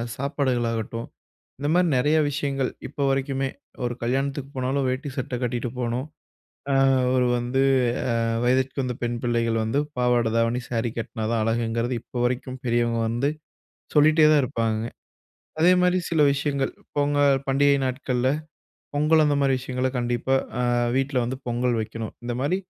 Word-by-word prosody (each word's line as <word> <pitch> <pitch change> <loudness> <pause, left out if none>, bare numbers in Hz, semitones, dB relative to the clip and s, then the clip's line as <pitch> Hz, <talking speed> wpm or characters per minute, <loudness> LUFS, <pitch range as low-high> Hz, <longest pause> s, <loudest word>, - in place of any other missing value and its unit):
சாப்பாடுகள் 130 -3 0
ஆகட்டும், 115 +1 -4 0.5
இந்த 145 +1 -1
மாதிரி 180 0 +3
நிறைய 150 +5 +3
விஷயங்கள் 140 -2 -1 0.2
இப்போ 140 - -4
வரைக்குமே, 135 0 0 0.4
ஒரு 120 -1 -2
கல்யாணத்துக்கு 135 +3 -1
போனாலும் 130 +1 0
வேட்டி 130 +2 -3
சட்ட 130 -1 -4
கட்டிகிட்டு 120 -1 -2
போணும். 120 +2 -1 0.7
அ - - +3 0.4
ஒரு 125 -1 +3
வந்து 125 +3 0 0.8
வயதிற்க்கு 130 +2 +1
வந்த 125 -1 -3
பெண் 120 0 -1
பிள்ளைகள் 115 -2 +1
வந்து 115 +6 +1 0.2
பாவாடை 120 -2 +2
தாவணி, 115 +2 +1
சாரி 115 -1 -1
கட்டினா 110 -1 -4
தான் 115 - +1
அழகுங்கிறது, 115 +2 0
இப்போ - - -9
வரைக்கும் 130 +1 -2
பெரியவங்க 120 -1 +1
வந்து 120 +6 0 0.7
சொல்லிட்டே 155 +1 +6
தான் 150 -2 +4
இருப்பாங்க. 115 -2 -1 0.8
அதே 175 +3 +6
மாதிரி 180 0 +3
சில 160 -2 +2
விஷயங்கள், 140 -1 -1 0.2
பொங்கல் 145 -1 +3
பண்டிகை 140 +1 +4
நாட்கள்ல 130 0 0 0.6
பொங்கல் 155 +2 +4
அந்த 145 -1 +2
மாதிரி 135 -1 +3
விஷயங்கள 130 0 -2
கண்டிப்பா 120 +2 0 0.3
அ - - +1 0.3
வீட்ல 135 0 0
வந்து 125 +3 -3
பொங்கல் 120 0 0
வைக்கணும். 110 0 -5
இந்த 120 0 -3
மாதிரி 145 +7 +1
130 Hz, 145 wpm, -24 LUFS, 120-140 Hz, 0.8 s, சொல்லிட்டே